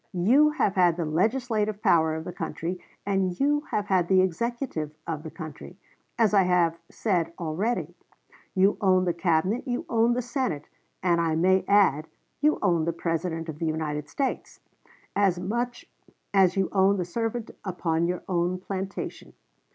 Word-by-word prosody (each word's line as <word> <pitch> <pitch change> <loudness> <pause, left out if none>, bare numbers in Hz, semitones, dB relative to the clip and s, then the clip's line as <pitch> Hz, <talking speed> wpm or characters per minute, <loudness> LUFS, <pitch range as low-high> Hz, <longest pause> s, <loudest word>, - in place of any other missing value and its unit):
You 260 +12 +5
have 300 -10 0
had 175 -3 +3
the 170 - -1
legislative 215 +5 0
power 160 -1 +4
of 160 - -4
the 180 - -7
country, 170 +2 -4 0.3
and 190 -3 0
you 290 +1 +2
have 210 - -1
had 185 -4 +2
the 185 0 +5
executive 190 - -2
of 160 -2 -3
the 160 - -7
country, 160 +2 -9 0.4
as 220 -3 +3
I 200 - +6
have 175 -2 +2
said 180 -6 0
already. 180 +9 -2 0.6
You 195 +2 +3
own 185 -2 +4
the 175 - +1
Cabinet, 175 - 0
you 245 -1 -2
own 230 +1 +3
the 250 +1 -1
Senate, 240 - -2 0.4
and 170 -2 +3
I 165 -1 +1
may 185 +3 +3
add, 175 -7 +4 0.3
you 300 +1 +3
own 170 -5 +2
the 170 - 0
President 165 0 -2
of 155 -1 -7
the 165 - -1
United 150 -2 -3
States, 270 -2 -3 0.6
as 195 -3 +2
much 240 +6 -3 0.5
as 190 -2 +4
you 190 -1 +1
own 195 0 +3
the 180 - -1
servant 225 +5 -3
upon 170 -3 -1
your 180 0 -3
own 180 0 0
plantation. 190 +1 -6
185 Hz, 165 wpm, -26 LUFS, 165-210 Hz, 0.6 s, I